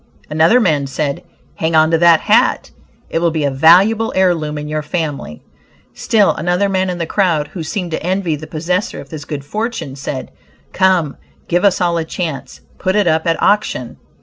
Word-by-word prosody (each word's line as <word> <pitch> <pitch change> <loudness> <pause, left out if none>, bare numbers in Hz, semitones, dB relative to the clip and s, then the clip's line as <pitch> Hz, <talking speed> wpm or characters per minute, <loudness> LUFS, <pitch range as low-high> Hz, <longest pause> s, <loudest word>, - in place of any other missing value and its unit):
Another 160 +10 +4
man 150 - +1
said, 140 +1 -3 0.4
"Hang 160 0 -1
on 160 +1 +4
to 165 - +4
that 170 -1 +5
hat, - - +2 0.4
it - - 0
will 170 0 +2
be 155 -2 -2
a 140 - +1
valuable 190 +11 +4
heir 190 -1 +4
loom 155 -2 -4
in 150 0 -5
your 155 0 -2
family." 150 - -4 0.5
Still 210 -3 +2
another 180 +3 0
man 190 -1 0
in 180 - -3
the 170 - -2
crowd 165 -5 0
who 180 - -7
seemed 175 +2 -4
to 160 - -3
envy 180 -2 -1
the 155 +1 -9
possessor 170 +5 -2
of - - -11
this 155 -3 -8
good 140 -2 -6
fortune, 215 - -4
said, 135 -1 -6 0.4
"Come, 185 -6 +2 0.3
give 175 +2 0
us 200 -3 +3
all 170 -2 +1
a - - -1
chance; 160 -4 -5 0.2
put 185 +1 0
it 210 -2 +3
up 160 0 +1
at 165 - +1
auction!" 200 - 0
165 Hz, 195 wpm, -16 LUFS, 155-185 Hz, 0.5 s, that